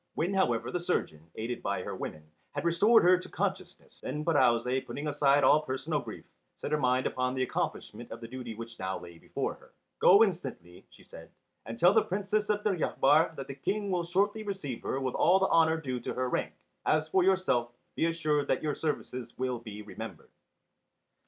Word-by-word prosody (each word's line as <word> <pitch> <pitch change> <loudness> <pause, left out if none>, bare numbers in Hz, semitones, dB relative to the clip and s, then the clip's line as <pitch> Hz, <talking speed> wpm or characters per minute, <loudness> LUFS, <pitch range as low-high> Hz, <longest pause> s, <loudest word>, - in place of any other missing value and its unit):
When 175 +5 0
however 125 -12 +1
the 180 - -1
surgeon, 85 - -2
aided 115 +2 -4
by - - -2
her - - -5
women, 75 - -6 0.3
had - - -4
restored 200 +7 +5
her 180 +1 +6
to - - -10
consciousness, - - -4
then 150 +1 -4
Pirouzè, 130 -4 +2
putting 145 - -5
aside 145 -1 +3
all 155 - +6
personal 150 +2 -2
grief, - - -9 0.3
set - - -5
her 150 - +2
mind 130 -1 +2
upon 130 0 -1
the 130 - +1
accomplishment 130 - -4
of - - -7
the 115 - -8
duty 120 -2 -7
which 115 +1 -9
now 95 0 -2
lay 85 -1 -12
before - - -3
her. - - -20 0.3
"Go 200 +4 +7
instantly," 135 - -4
she - - -18
said, - - -13 0.4
"and 115 0 -6
tell 180 +9 +5
the - - +5
Princess 205 +2 -1
of 210 0 +1
Deryabar 160 -5 +2
that 135 - -6
the 135 - -7
King 200 +9 -2
will 175 -2 0
shortly 200 +5 0
receive 190 - -5
her 135 - -2
with 130 -2 -2
all 180 +3 +4
the 190 0 +2
honour 160 -1 +4
due 130 -5 -3
to - - -5
her 130 0 0
rank. - - -2 0.3
As 155 0 +2
for 185 +3 +2
yourself, 180 -11 +2 0.2
be 165 - +2
assured 155 -3 0
that - - 0
your 150 -1 0
services 130 -6 -4
will 125 -1 -2
be 105 -2 -9
remembered." 105 - -9
150 Hz, 195 wpm, -30 LUFS, 125-180 Hz, 0.4 s, Go